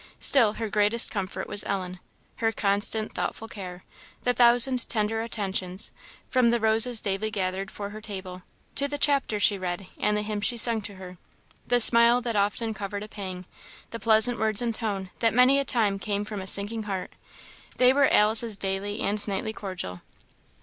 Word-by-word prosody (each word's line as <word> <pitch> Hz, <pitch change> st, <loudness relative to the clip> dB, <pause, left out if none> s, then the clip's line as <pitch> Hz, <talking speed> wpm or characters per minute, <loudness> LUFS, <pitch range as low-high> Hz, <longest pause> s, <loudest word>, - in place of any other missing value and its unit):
Still 230 Hz, -7 st, +3 dB
her 225 Hz, 0 st, -4 dB
greatest 210 Hz, +3 st, +3 dB
comfort 195 Hz, -2 st, -5 dB
was 205 Hz, -, +1 dB
Ellen; 185 Hz, -2 st, -4 dB, 0.4 s
her 225 Hz, -1 st, 0 dB
constant, 210 Hz, +1 st, -1 dB
thoughtful 225 Hz, -, -4 dB
care; 185 Hz, -4 st, -9 dB, 0.4 s
the 245 Hz, -, +1 dB
thousand 245 Hz, +1 st, +4 dB
tender 225 Hz, 0 st, -1 dB
attentions, 195 Hz, -3 st, -2 dB, 0.4 s
from 255 Hz, -2 st, +2 dB
the 235 Hz, 0 st, +1 dB
roses 225 Hz, +2 st, +4 dB
daily 200 Hz, +1 st, -2 dB
gathered 190 Hz, -2 st, -3 dB
for 200 Hz, -1 st, -7 dB
her 215 Hz, +1 st, -9 dB
table, 190 Hz, -4 st, -8 dB, 0.3 s
to 280 Hz, -, +2 dB
the 290 Hz, 0 st, -4 dB
chapters 275 Hz, -7 st, +1 dB
she 200 Hz, -2 st, +3 dB
read 180 Hz, +1 st, -4 dB
and 210 Hz, 0 st, 0 dB
the 210 Hz, -, -2 dB
hymns 210 Hz, -1 st, -2 dB
she 240 Hz, -, -1 dB
sung 230 Hz, -1 st, +5 dB
to 205 Hz, -1 st, -9 dB
her; 180 Hz, -1 st, -11 dB, 0.5 s
the 245 Hz, 0 st, +2 dB
smile 235 Hz, +1 st, +6 dB
that 235 Hz, -2 st, -4 dB
often 210 Hz, +3 st, -1 dB
covered 205 Hz, 0 st, -6 dB
a -, -, -8 dB
pang; 185 Hz, -4 st, -8 dB, 0.5 s
the 230 Hz, -, -6 dB
pleasant 225 Hz, +2 st, +3 dB
words 215 Hz, -1 st, +3 dB
and 235 Hz, -1 st, 0 dB
tone 200 Hz, -5 st, -4 dB
that 225 Hz, -1 st, +1 dB
many 255 Hz, +3 st, +5 dB
a -, -, 0 dB
time 210 Hz, -6 st, 0 dB
came 205 Hz, 0 st, -3 dB
from 210 Hz, -2 st, -6 dB
a 190 Hz, -, -8 dB
sinking 205 Hz, +4 st, 0 dB
heart; 190 Hz, -2 st, -4 dB, 0.7 s
they 250 Hz, 0 st, +5 dB
were 280 Hz, 0 st, +3 dB
Alice's 220 Hz, 0 st, +2 dB
daily 195 Hz, +2 st, -4 dB
and 205 Hz, +1 st, -2 dB
nightly 205 Hz, +2 st, -3 dB
cordial. 180 Hz, -, -7 dB
210 Hz, 180 wpm, -25 LUFS, 195-230 Hz, 0.7 s, smile